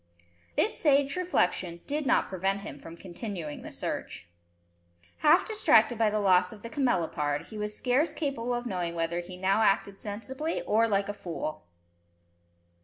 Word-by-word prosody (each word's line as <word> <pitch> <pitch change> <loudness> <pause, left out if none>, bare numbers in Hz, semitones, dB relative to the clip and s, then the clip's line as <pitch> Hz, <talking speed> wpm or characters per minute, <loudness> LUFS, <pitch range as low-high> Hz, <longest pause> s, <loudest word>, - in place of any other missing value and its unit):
This - - +2
sage 280 -2 +3
reflection 180 - 0
did 290 0 -1
not - - +3
prevent 195 +1 -1
him 205 - -8
from 165 0 -11
continuing 175 -4 -6
the - - -8
search. 85 - -4 0.9
Half 310 +4 +5
distracted 420 - +3
by 220 -2 +4
the 210 0 0
loss 185 -2 +4
of 210 - -12
the 230 - -7
camelopard, 165 - 0
he 215 - -8
was 210 0 -3
scarce 260 +6 +2
capable 250 -5 -2
of 240 0 -4
knowing 180 -6 -2
whether 165 +1 -1
he 180 +1 -8
now 195 +3 +2
acted 195 -1 +2
sensibly, 265 +10 -4
or 225 +2 +3
like 200 -2 +1
a 205 - -3
fool! 160 - -6
205 Hz, 160 wpm, -29 LUFS, 180-250 Hz, 0.9 s, Half